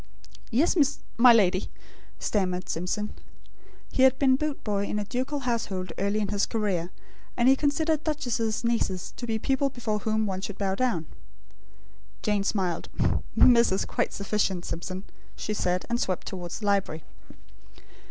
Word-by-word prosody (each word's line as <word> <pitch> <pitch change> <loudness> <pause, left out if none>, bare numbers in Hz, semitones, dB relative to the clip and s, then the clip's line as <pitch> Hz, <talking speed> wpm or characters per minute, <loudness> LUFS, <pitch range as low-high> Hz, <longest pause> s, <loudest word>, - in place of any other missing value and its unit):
"Yes, 270 +11 +2
miss 290 -4 +3 0.2
m'lady," 215 -7 +5 0.5
stammered 185 -3 -1
Simpson. 185 +5 -2 0.8
He - - 0
had 265 0 +6
been 265 -2 +4
boot 300 +1 -3
boy 200 -2 0
in 210 - -2
a 210 - -1
ducal 260 +6 -2
household 210 -8 -2
early 200 +2 0
in 205 - -1
his 205 -1 +1
career; 195 -6 -1 0.5
and 240 +1 +3
he 265 - +7
considered 305 +2 +1
duchesses' 245 -8 -1
nieces 230 -6 -1
to 240 - -5
be 225 -1 0
people 270 +4 +1
before 225 -5 -2
whom 220 +1 0
one 190 -2 -3
should 200 0 -5
bow 195 -2 0
down. 195 -7 0 1.2
Jane 210 -2 +1
smiled. 185 -4 -1 0.5
"'Miss' 235 -3 +6
is 190 - 0
quite - - -1
sufficient, 200 -3 -1
Simpson," 185 +3 -5 0.3
she 210 - -3
said; 180 -3 0
and 235 0 0
swept 185 -6 -1
towards 180 +2 -6
the - - -4
library. 195 -6 0
210 Hz, 150 wpm, -27 LUFS, 190-250 Hz, 1.2 s, he